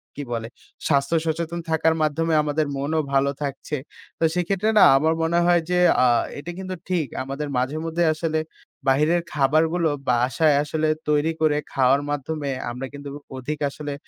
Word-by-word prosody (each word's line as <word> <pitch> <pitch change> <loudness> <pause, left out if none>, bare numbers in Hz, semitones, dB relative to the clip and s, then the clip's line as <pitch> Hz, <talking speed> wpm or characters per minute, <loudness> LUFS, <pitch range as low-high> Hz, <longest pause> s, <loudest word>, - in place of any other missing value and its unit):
কি 145 - -5
বলে 115 -1 -3 0.4
স্বাস্থ্য 140 +2 +2
সচেতন 165 +1 -2
থাকার 160 0 +2
মাধ্যমে 160 +2 +1
আমাদের 150 0 0
মনও 150 +3 0
ভালো 140 +1 +3
থাকছে। 140 +2 -4 0.4
তো - - -1
সেক্ষেত্রে 190 +4 0
না - - +8
আমার 160 +3 +2
মনে 170 +1 +2
হয় 175 -1 +4
যে 180 - +3 0.2
আ - - +5 0.3
এটা 165 +4 -6
কিন্তু 185 -1 -5
ঠিক 170 -6 0 0.2
আমাদের 140 +3 -4
মাঝে 130 +4 -1
মধ্যে 165 +1 0
আসলে 160 0 -1 0.5
বাহিরের 150 +6 +3
খাবারগুলো 160 +4 +2 0.2
বাসায় 125 +5 +3
আসলে 155 +1 -1 0.2
তৈরি 150 +2 +2
করে 150 -2 +3 0.2
খাওয়ার 135 +1 +3
মাধ্যমে 145 0 -3 0.2
আমরা 125 +2 -5
কিন্তু 145 0 -8 0.3
অধিক 145 +4 -4
আসলে 145 0 -6
155 Hz, 160 wpm, -23 LUFS, 140-165 Hz, 0.5 s, না